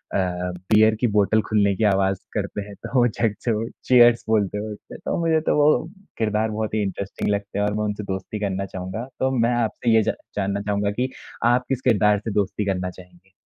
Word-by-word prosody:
Beer 90 +4 +2
की 125 - +3
बोतल 105 +2 +3
खुलने 100 -2 +3
की 110 - -1
आवाज़ 95 -2 +2
करते 105 0 -3
हैं 100 - -10
तो - - -7
वो 120 - +5
झट 110 -2 -1
से 120 - +1
वो 110 +1 -1 0.2
चीयर्स 120 -2 +6
बोलते 105 -3 +1
हुए 105 +1 -4
उठते 105 - -11
हैं। - - -9
तो - - -1
मुझे 160 -1 +3
तो - - +3
वो 150 +2 +3 0.3
किरदार 110 0 0
बहुत 110 0 -3
ही 110 - +1
इंटरेस्टिंग 100 +1 -3
लगते 100 0 -2
हैं 105 - +2
और 105 - 0
मैं 105 0 -1
उनसे 105 0 -3
दोस्ती 95 +2 -5
करना 100 -1 -2
चाहूँगा, 95 +5 -6
तो 130 0 +1
मैं 115 +1 +2
आपसे 115 0 0
ये 110 - +6
ज - - 0 0.2
जानना 100 +1 -1
चाहूँगा 100 0 0
कि 125 +5 -1 0.4
आप 120 +1 +3
किस 135 -2 -1
किरदार 105 -4 +3
से 110 +2 -5
दोस्ती 100 +1 -1
करना 90 -2 -1
चाहेंगे? 90 +1 -16
105 Hz, 220 wpm, -23 LUFS, 100-110 Hz, 0.4 s, चीयर्स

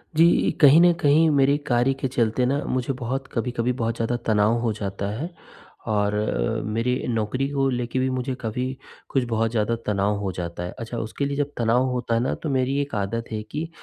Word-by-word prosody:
जी। 165 +2 +4
कहीं 150 +2 +8
न 175 0 +7
कहीं 155 +3 +5
मेरे 140 -1 +3
कार्य 125 +2 +3
के 135 0 -3
चलते 120 -1 +1
न 140 +3 +1
मुझे 130 +1 -1
बहुत 135 +2 -3
कभी-कभी 120 0 -1
बहुत 115 0 0
ज़्यादा 115 +1 -1
तनाव 105 0 +3
हो 115 -1 0
जाता 100 -1 -4
है। 165 +5 -3 0.6
और 105 -1 +1
अ, 105 - -1
मेरी 115 +4 0
नौकरी 120 +3 -1
को 135 -1 +1
लेकर 125 0 -2
भी 130 0 +1
मुझे 130 +1 -2
कभी 115 +2 -2 0.5
कुछ 135 - +1
बहुत 115 -1 0
ज़्यादा 115 0 +1
तनाव 105 0 +1
हो 100 -2 -2
जाता 85 0 -5
है। 90 - -5
अच्छा 115 +1 -5
उसके 115 +5 -3
लिए 140 0 -2
जब 145 0 -1
तनाव 120 +2 +2
होता 125 -2 -2
है - - +2
ना, 125 - 0
तो 155 - -5
मेरी 135 0 +1
एक 140 -4 -4
आदत 105 +3 -2
है 110 -1 -2
कि 160 +2 -3
120 Hz, 210 wpm, -24 LUFS, 110-135 Hz, 0.6 s, कहीं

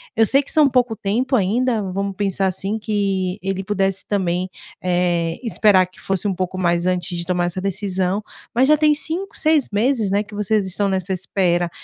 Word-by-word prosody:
Eu 225 -1 +4
sei 275 +6 +4
que - - -8
são 305 -2 +5
pouco 245 -3 +1
tempo 230 +7 0
ainda, 225 +2 +1
vamos 195 +1 -3
pensar 195 -1 0
assim, 195 +4 -2
que 195 -3 -1
ele 195 0 -2
pudesse 195 -1 -1
também, 185 -2 -1 0.3
eh, 175 -2 0
esperar 210 -5 +4
que 185 +1 -19
fosse 195 +1 0
um 195 - 0
pouco 185 0 -3
mais 175 -1 +1
antes 180 0 -1
de 170 - -3
tomar 175 0 0
essa 175 +2 -3
decisão, 195 0 -1 0.3
mas 255 +3 +4
já 305 - +6
tem 300 0 +4
5, 335 +6 -2
6 310 -3 +2
meses, 220 0 +1
né, 200 +1 +2
que 210 - -16
vocês 210 0 +1
estão 195 +2 -1
nessa 190 0 -1
espera, 175 -2 0
195 Hz, 195 wpm, -20 LUFS, 185-220 Hz, 0.3 s, já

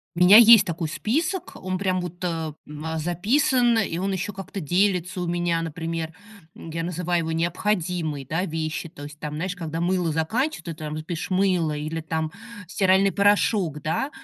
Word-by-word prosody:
У - - -4
меня 195 +4 +9
есть 230 -1 +9
такой 165 -1 -3
список, 310 - -2
он 185 0 -3
прям 185 -2 0
вот, 175 -1 -6
ам, 160 -3 -3 0.4
записан, 230 - +2
и 180 -5 0
он 195 +1 -1
еще 190 +2 -3
как-то 195 +1 -7
делится 180 +1 0
у 175 - -2
меня, 175 -1 0
например, 165 0 -4 0.4
я 165 0 -5
называю 175 0 -1
его 160 - -3
необходимой, 170 -3 -1
да, 165 +7 -1
вещью. 160 0 -3
То 145 -4 -12
есть, 150 +1 -10
там, 150 -1 -5
знаешь, 180 +4 -3
когда 165 -2 -5
мыло 175 -2 +1
заканчивается, 205 - -1
ты - - -5
там 155 0 -6
пишешь 170 +1 -5
"мыло" 180 -5 +1
или, 155 +2 -4
там, 160 0 -3 0.4
стиральный 190 +1 +3
порошок, 200 -6 +2
да? 165 - -1
175 Hz, 170 wpm, -24 LUFS, 160-195 Hz, 0.4 s, меня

